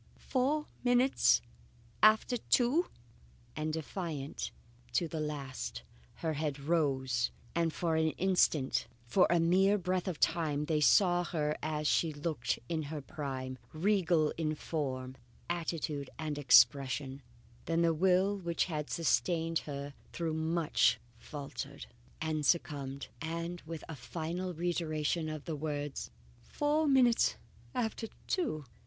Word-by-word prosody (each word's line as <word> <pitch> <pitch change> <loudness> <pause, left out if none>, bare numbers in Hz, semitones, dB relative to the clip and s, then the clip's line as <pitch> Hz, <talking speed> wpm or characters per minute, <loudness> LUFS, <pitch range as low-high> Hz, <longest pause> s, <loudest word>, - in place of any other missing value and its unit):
"Four 285 +4 0 0.2
minutes 245 +2 +4 0.6
after 220 +3 +5
two!" 255 +9 +2 0.7
And 155 0 -2
defiant 160 -2 -4 0.4
to 170 +8 +2
the 160 0 -4
last, 135 - -4 0.3
her 160 -1 -2
head 150 -1 -2
rose, 135 -6 +1 0.2
and 170 -1 +1
for 165 0 0
an 160 0 +3
instant, 175 -10 +2 0.2
for 180 +10 +4
a 175 - +4
mere 190 +5 +4
breath 185 0 -1
of 175 -5 -3
time, 150 -3 +1
they 155 -1 +1
saw 175 +2 +5
her 150 -3 -1
as 150 0 -1
she 165 - +3
had 150 -1 -7
looked 130 -8 0
in 160 -2 -1
her 155 -1 -4
prime, 130 -3 -5
regal 170 -3 +2
in 155 -1 0
form, 130 -5 -3 0.3
attitude, 160 -4 -2
and 155 -2 -3
expression; 135 +1 +4 0.4
then 165 +1 +1
the 165 -1 +4
will 185 +4 +3
which 170 -4 -1
had 150 -4 -4
sustained 165 0 +1
her 140 -1 -6 0.2
through 165 -2 -2
so - - -2
much, 160 -7 +2 0.2
faltered 140 +3 -7 0.3
and 155 -1 -1
succumbed, 140 -4 0
and 170 +2 -4
with 165 -2 -6
a 160 - -6
final 160 +9 -4
reiteration 160 -2 -1
of 155 -2 -6
the 160 - -3
words 145 -1 -4 0.3
"Four 295 - 0
minutes 255 -4 +4 0.4
after 225 -2 -1 0.2
two!" 225 - -1
160 Hz, 130 wpm, -32 LUFS, 145-175 Hz, 0.7 s, after